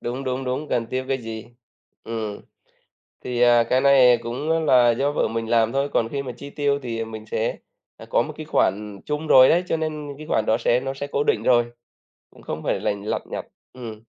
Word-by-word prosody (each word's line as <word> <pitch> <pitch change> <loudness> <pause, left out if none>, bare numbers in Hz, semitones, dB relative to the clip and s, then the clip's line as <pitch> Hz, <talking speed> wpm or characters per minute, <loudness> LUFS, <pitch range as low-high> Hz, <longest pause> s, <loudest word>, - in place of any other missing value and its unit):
Đúng, 125 +3 -4
đúng, 130 +1 -2
đúng, 130 +4 -3
cần 115 -1 0
tiêu 130 +2 -3
cái 135 -1 0
gì. 110 -1 -7 0.6
Ừm. 110 -2 -5 0.8
Thì, 125 -1 -2
à, 120 -1 +6
cái 130 +3 +1
này 130 -3 +6
cũng 130 +7 -3
á 165 - +2
là 125 -6 +5
do 140 +5 0
vợ - - 0
mình 115 0 -4
làm 115 -1 +3
thôi, 140 +1 0
còn 115 0 +1
khi 140 +1 -3
mà 125 - -5
chi 140 - -9
tiêu 140 -1 0
thì, 115 -2 -4
ờ, 115 - -2
mình 110 -1 -9
sẽ, 110 +1 -2 0.4
ờ, - - -11
có - - +3
một - - -5
cái - - -7
khoản 100 +1 0
chung 150 +1 -3
rồi 130 0 +8
đấy, 175 +2 +3
cho 165 - 0
nên 155 -2 -4
những 140 -1 -8
cái 155 +1 -10
khoản 110 - +1
đó 110 - +3
sẽ 120 - +2
nó 135 +1 -4
sẽ 140 +1 -5
cố 140 0 -1
định 110 -6 +1
rồi, 120 -1 +4 0.6
cũng - - -19
không - - -6
phải - - 0
lành 100 -1 -2
lặt - - -2
nhặt. - - -4 0.3
Ừm. 115 -4 -9
125 Hz, 240 wpm, -23 LUFS, 115-140 Hz, 0.8 s, rồi